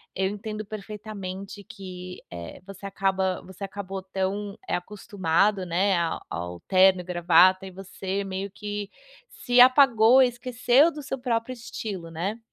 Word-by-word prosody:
Eu 190 0 +1
entendo 215 +1 -5
perfeitamente 200 -1 -7
que, 185 -2 -9
eh, 85 -1 -8
você 195 0 -10
acaba 190 -1 -1
você 190 +1 -11
acabou 195 -1 -5
tão, 195 +2 -3
eh, - - 0
acostumado, 195 0 0
né, 185 +3 +1
ao 170 -1 -1
ao 90 0 -5
terno 185 -1 +4
e - - -10
gravata 180 +2 +4
e - - -9
você 195 +1 -5
meio 195 0 -5
que 205 -1 -5 0.4
se 245 -1 0
apagou 255 -2 +6
e - - +5
esqueceu 250 +5 +3
do 300 -1 -8
seu 270 - -4
próprio 245 0 -1
estilo, 205 -7 -7
né. 185 +7 -3
195 Hz, 150 wpm, -26 LUFS, 185-215 Hz, 0.4 s, apagou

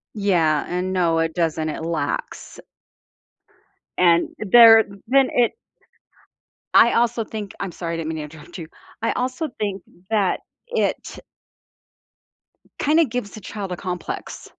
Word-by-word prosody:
Yeah, 170 -7 +1
and 180 +1 -2
no, 170 -3 +2
it 165 0 0
doesn't, 160 -2 -1
it 155 - -5
lacks 165 -3 -4 1.4
and 170 -1 +4
there 225 +1 +8 0.2
then 270 +1 +4
it 240 -2 +2 1.2
I 235 - +6
also 235 -1 +1
think 210 -2 -7
I'm 195 -3 -4
sorry, 170 0 -5
I - - -3
didn't 160 -1 -4
mean 160 - -4
to 150 - -4
interrupt 155 +4 -11
you, 165 -3 -7 0.3
I 225 - +1
also 255 +5 -2
think 200 -3 -3 0.3
that 205 -4 +1 0.3
it 485 - -2 1.6
kinda 310 +3 +4
gives 240 -4 -4
the 215 - -10
child 195 -1 -6
a - - -2
complex. 180 -1 -6
190 Hz, 135 wpm, -22 LUFS, 165-225 Hz, 1.6 s, there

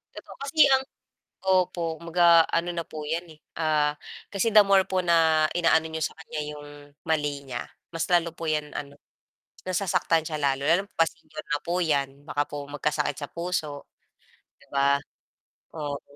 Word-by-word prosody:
Eto - - -11
kasi 280 +3 +4
ang 265 0 +4 0.6
opo, 175 -3 +1
kumbaga 170 0 +5
ano 175 +1 0
na 170 - -2
po 155 -2 -8
'yan, 165 +3 -1
eh, 155 - -15 0.2
ah, 150 -2 +2 0.4
kasi 200 +3 +1
the 215 -1 +8
more 195 -1 +5
po 185 - 0
na 160 -2 +4
inaano 165 -2 +3
niyo 160 0 -5
sa - - -2
kanya 155 -1 -6
'yong 150 0 -8 0.4
mali 145 -3 -1
niya, 120 -2 -4 0.3
mas 165 - -2
lalo 170 -2 +2
po 165 -1 -3
'yan, 150 -1 -2
ano 140 0 -7 0.7
nasasaktan 180 -3 +1
siya 155 - -3
lalo. 140 0 0
Lalo 180 +4 +4
pa 165 0 +3
senior 155 0 -11
na 150 - 0
po 175 +2 -1
'yan 140 -3 -1
baka 145 0 0
po 145 -1 -7
magkasakit 145 -1 -1
sa 145 - -5
puso 165 -4 -3 0.7
'di - - -22
ba, 140 0 +3 0.8
oo 145 -2 -4
160 Hz, 165 wpm, -26 LUFS, 145-170 Hz, 0.8 s, the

